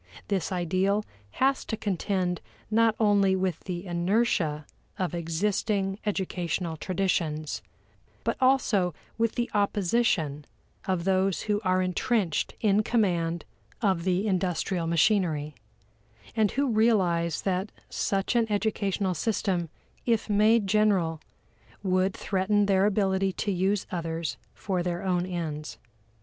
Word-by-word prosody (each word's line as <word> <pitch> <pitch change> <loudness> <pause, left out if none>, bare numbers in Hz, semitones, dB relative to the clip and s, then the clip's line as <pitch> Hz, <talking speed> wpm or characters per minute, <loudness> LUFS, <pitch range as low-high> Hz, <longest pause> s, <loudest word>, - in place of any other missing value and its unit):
This 195 -2 -1
ideal 185 +4 +1 0.3
has 270 +1 +2
to 220 - -3
contend 185 -3 -1 0.3
not 225 0 +4
only 200 -3 +4
with 185 -3 -1
the 180 0 -4
inertia 175 -4 +1 0.3
of 185 -2 -2
existing 195 +4 -1
educational 180 -4 -2
traditions, 165 -4 -1 0.6
but - - 0
also 215 - +3 0.2
with 230 -1 +1
the 240 -1 0
opposition 200 -7 +1 0.4
of 185 -3 0
those 190 0 +1
who 210 -1 0
are 185 -1 +2
entrenched 185 -1 0
in 210 -1 +4
command 175 -7 0 0.3
of 190 -6 +1
the 185 +2 +1
industrial 180 -2 0
machinery, 165 -4 +2 0.8
and 215 -2 +3
who 275 -1 +1
realize 185 -7 +2
that 190 +1 -1 0.2
such 195 +4 -1
an 225 -2 +2
educational 200 -2 0
system 180 -3 -1 0.4
if 230 -2 +2
made 215 +1 +4
general 190 -6 +2 0.6
would 185 0 +1
threaten 205 +1 +1
their 195 0 +3
ability 195 -2 +1
to 205 - -2
use 190 +2 +1
others 165 -2 -3 0.2
for 185 -3 -2
their 175 0 -2
own 180 -1 0
ends. 160 -4 -4
190 Hz, 120 wpm, -27 LUFS, 175-210 Hz, 0.8 s, not